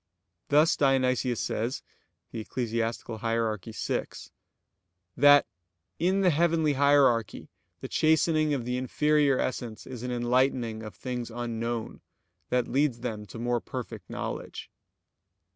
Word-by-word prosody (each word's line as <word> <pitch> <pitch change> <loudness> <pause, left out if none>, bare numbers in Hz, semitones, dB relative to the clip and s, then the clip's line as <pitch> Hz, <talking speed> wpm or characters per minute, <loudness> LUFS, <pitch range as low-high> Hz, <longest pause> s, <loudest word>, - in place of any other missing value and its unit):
Thus 150 +3 +5
Dionysius 130 -3 +2
says 115 +4 -2 0.5
(Eccl. 115 0 -3
Hier. 115 -1 0
vi): 110 +3 -3 1.1
that 145 +2 +7 0.5
"in 185 +3 +2
the 185 -2 +4
heavenly 160 -1 +2
hierarchy 140 -4 +3 0.3
the - - -5
chastening 155 -1 +2
of 125 -4 -4
the 125 +1 -1
inferior 145 +2 +2
essence 120 -4 -3
is 125 -3 -8
an 125 - -4
enlightening 120 -2 0
of 110 -1 -9
things 125 -2 -5
unknown, 115 -1 -4 0.5
that 125 -1 +1
leads 135 -3 0
them 110 -4 -5
to 95 - -10
more 120 0 -1
perfect 115 -7 -7
knowledge." - - -6
125 Hz, 115 wpm, -28 LUFS, 115-145 Hz, 1.1 s, that